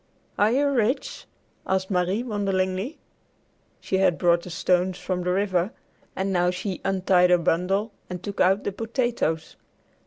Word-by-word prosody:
"Are 210 Hz, +2 st, +4 dB
you 275 Hz, +4 st, +2 dB
rich?" 255 Hz, -1 st, -1 dB, 0.4 s
asked 190 Hz, +1 st, 0 dB
Marie 185 Hz, +5 st, +1 dB
wonderingly. 195 Hz, +1 st, -1 dB, 0.8 s
She 190 Hz, -, -1 dB
had 190 Hz, -3 st, +3 dB
brought 170 Hz, -1 st, +3 dB
the 180 Hz, -, -9 dB
stones 180 Hz, +2 st, +1 dB
from 185 Hz, -1 st, -3 dB
the 180 Hz, 0 st, -1 dB
river, 185 Hz, 0 st, 0 dB, 0.4 s
and 195 Hz, +1 st, -1 dB
now 180 Hz, 0 st, +3 dB
she 185 Hz, +1 st, -4 dB
untied 185 Hz, -2 st, +3 dB
her 180 Hz, -, +6 dB
bundle 180 Hz, +6 st, 0 dB, 0.2 s
and 180 Hz, -1 st, -6 dB
took 200 Hz, -1 st, -3 dB
out 190 Hz, +2 st, +3 dB
the -, -, -2 dB
potatoes. 225 Hz, -, -2 dB
190 Hz, 150 wpm, -25 LUFS, 180-205 Hz, 0.8 s, her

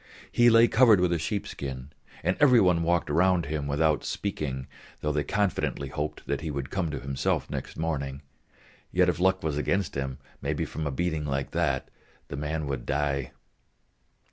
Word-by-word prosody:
He 120 Hz, 0 st, +5 dB
lay 115 Hz, 0 st, +7 dB
covered 115 Hz, -5 st, +6 dB
with 90 Hz, -1 st, +2 dB
a 85 Hz, -, 0 dB
sheepskin, 70 Hz, -7 st, -4 dB, 0.3 s
and 90 Hz, -, +2 dB
every 130 Hz, -5 st, +7 dB
one 90 Hz, -4 st, +4 dB
walked 85 Hz, +1 st, +1 dB
round 85 Hz, +3 st, +3 dB
him, 75 Hz, -1 st, -3 dB
without 75 Hz, +1 st, +2 dB
speaking; 70 Hz, -10 st, -3 dB, 0.4 s
though 75 Hz, -, 0 dB
they 75 Hz, -1 st, 0 dB
confidently 95 Hz, -9 st, -1 dB
hoped 75 Hz, +2 st, -4 dB
that -, -, -2 dB
he 80 Hz, -, -4 dB
would 70 Hz, -2 st, -4 dB
come 95 Hz, -4 st, -1 dB
to 75 Hz, -, -4 dB
himself 65 Hz, 0 st, -1 dB
next -, -, -5 dB
morning, 70 Hz, -3 st, -3 dB, 0.7 s
yet 90 Hz, 0 st, +4 dB
if 85 Hz, -, -1 dB
luck 95 Hz, +1 st, +2 dB
was 75 Hz, -2 st, -1 dB
against 90 Hz, 0 st, 0 dB
him, 65 Hz, -1 st, -3 dB, 0.2 s
maybe -, -, -1 dB
from 80 Hz, -1 st, -4 dB
a -, -, -1 dB
beating 80 Hz, +1 st, -1 dB
like 70 Hz, -1 st, -2 dB
that, -, -, 0 dB, 0.4 s
the -, -, -4 dB
man 75 Hz, +2 st, -2 dB
would 70 Hz, -4 st, -4 dB
die. 70 Hz, -2 st, -1 dB
75 Hz, 175 wpm, -27 LUFS, 70-90 Hz, 0.7 s, lay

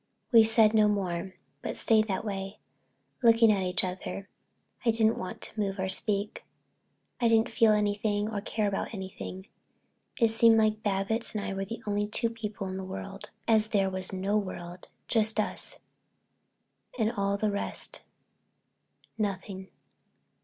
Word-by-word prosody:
We 230 Hz, -2 st, +8 dB
said 220 Hz, -1 st, +5 dB
no 215 Hz, -1 st, +5 dB
more, 190 Hz, -2 st, -2 dB, 0.3 s
but -, -, -5 dB
stayed 220 Hz, -1 st, +3 dB
that 195 Hz, +1 st, -3 dB
way, 195 Hz, -1 st, -5 dB, 0.6 s
looking 230 Hz, -2 st, +6 dB
at 200 Hz, -2 st, +1 dB
each 180 Hz, 0 st, -1 dB
other. 185 Hz, +2 st, -5 dB, 0.5 s
I 235 Hz, -, +2 dB
didn't 225 Hz, 0 st, +2 dB
want 185 Hz, -, -6 dB
to 220 Hz, -, -5 dB
move 195 Hz, -1 st, -1 dB
or 190 Hz, 0 st, -2 dB
speak. 200 Hz, +2 st, 0 dB, 0.8 s
I 240 Hz, -, +3 dB
didn't 225 Hz, 0 st, +3 dB
feel 225 Hz, -1 st, +4 dB
anything 205 Hz, 0 st, 0 dB
or 215 Hz, -2 st, -3 dB
care 210 Hz, 0 st, -1 dB
about 200 Hz, +2 st, -3 dB
anything. 190 Hz, -1 st, -7 dB, 0.7 s
It 230 Hz, -2 st, +4 dB
seemed 225 Hz, 0 st, +6 dB
like 215 Hz, -1 st, +2 dB
Babbitts 205 Hz, +3 st, -1 dB
and 205 Hz, -, -2 dB
I -, -, -3 dB
were 195 Hz, 0 st, -3 dB
the 230 Hz, +3 st, -8 dB
only 205 Hz, 0 st, -1 dB
two 230 Hz, +2 st, +1 dB
people 210 Hz, -3 st, -6 dB
in 185 Hz, 0 st, -5 dB
the -, -, -4 dB
whole 185 Hz, -, -9 dB
world, 95 Hz, -1 st, -8 dB, 0.2 s
as 220 Hz, -1 st, +4 dB
if -, -, -17 dB
there 195 Hz, -2 st, +2 dB
was 185 Hz, 0 st, -2 dB
no 195 Hz, +2 st, 0 dB
world, 180 Hz, -2 st, -8 dB, 0.2 s
just 220 Hz, -1 st, +2 dB
us, 215 Hz, -, +2 dB, 1.2 s
and 220 Hz, -2 st, +1 dB
all 200 Hz, -3 st, -1 dB
the 210 Hz, 0 st, 0 dB
rest 200 Hz, -, -3 dB, 1.2 s
nothing. 195 Hz, -2 st, -3 dB
205 Hz, 160 wpm, -28 LUFS, 195-220 Hz, 1.2 s, We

